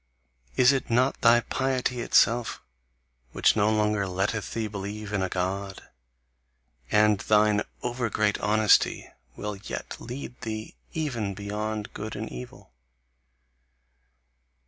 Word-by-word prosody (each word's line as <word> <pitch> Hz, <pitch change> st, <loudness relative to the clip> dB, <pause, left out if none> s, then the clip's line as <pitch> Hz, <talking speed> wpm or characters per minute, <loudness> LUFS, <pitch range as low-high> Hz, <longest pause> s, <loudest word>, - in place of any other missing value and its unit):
Is 125 Hz, +1 st, +6 dB
it 135 Hz, -2 st, -1 dB
not 125 Hz, +3 st, +2 dB
thy 120 Hz, 0 st, +6 dB
piety 130 Hz, -1 st, -1 dB
itself 120 Hz, 0 st, +3 dB, 0.7 s
which -, -, +3 dB
no 105 Hz, -1 st, +3 dB
longer 105 Hz, -2 st, +1 dB
letteth 95 Hz, +4 st, -2 dB
thee 115 Hz, -1 st, -1 dB
believe 105 Hz, +1 st, -6 dB
in 100 Hz, -, +1 dB
a 95 Hz, -, -1 dB
God? 95 Hz, +2 st, -3 dB, 1.1 s
And 105 Hz, -1 st, +4 dB
thine 105 Hz, 0 st, +3 dB, 0.2 s
over 120 Hz, -1 st, -1 dB
great 105 Hz, 0 st, +1 dB
honesty 105 Hz, 0 st, +3 dB, 0.2 s
will 105 Hz, -1 st, -5 dB
yet 100 Hz, -, -6 dB
lead 125 Hz, 0 st, -7 dB
thee 110 Hz, -1 st, -5 dB, 0.2 s
even 120 Hz, -11 st, -2 dB
beyond 105 Hz, +1 st, -4 dB
good 110 Hz, +1 st, -6 dB
and -, -, -4 dB
evil! 60 Hz, 0 st, -10 dB
105 Hz, 120 wpm, -27 LUFS, 100-120 Hz, 1.1 s, Is